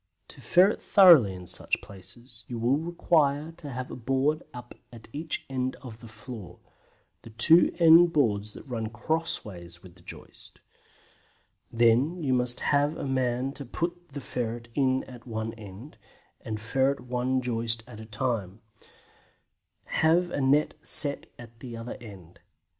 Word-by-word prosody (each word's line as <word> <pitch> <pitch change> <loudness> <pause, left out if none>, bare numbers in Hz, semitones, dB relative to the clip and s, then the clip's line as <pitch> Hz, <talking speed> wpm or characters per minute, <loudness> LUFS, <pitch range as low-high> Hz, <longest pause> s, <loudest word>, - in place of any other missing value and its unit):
To - - -13
ferret 185 +4 +3
thoroughly 165 - +6
in 90 -1 -10
such - - 0
places 110 +5 -11
you 120 - -5
will 120 +5 +1
require 160 -3 +1
to 150 - -9
have 130 -1 -6
a - - -6
board 135 +5 0
up 120 0 -10 0.2
at 115 -2 -12
each 155 +1 -4
end 130 -1 -2
of 120 -4 -11
the 115 - -12
floor: 110 -2 -10 0.6
the - - -12
two 155 +10 +5
end 170 0 +7
boards 105 -8 0
that - - -10
run 115 -4 -4
crossways 110 - -4
with 90 -2 -14
the 90 - -20
joist; - - -12 1.1
then 120 +8 +3
you 130 -3 +1
must 125 -1 +1
have 145 +2 +1
a - - -4
man 130 0 -1
to 140 - -8
put 175 +6 -5
the 140 0 -7
ferret 115 -2 -4
in 130 -1 +1
at 125 -1 -13
one 110 -1 -4
end, 110 +5 -12 0.4
and 110 -1 -5
ferret 130 +5 0
one 125 +1 -1
joist 115 -2 0
at 115 -3 -12
a 110 - -9
time; 110 -3 -3 1.2
have 170 +2 +2
a 145 - -2
net 140 +3 +2
set 140 -1 +3
at 115 -1 -14
the 120 -1 -8
other 115 +1 -7
end. 95 -7 -13
125 Hz, 155 wpm, -27 LUFS, 115-145 Hz, 1.2 s, end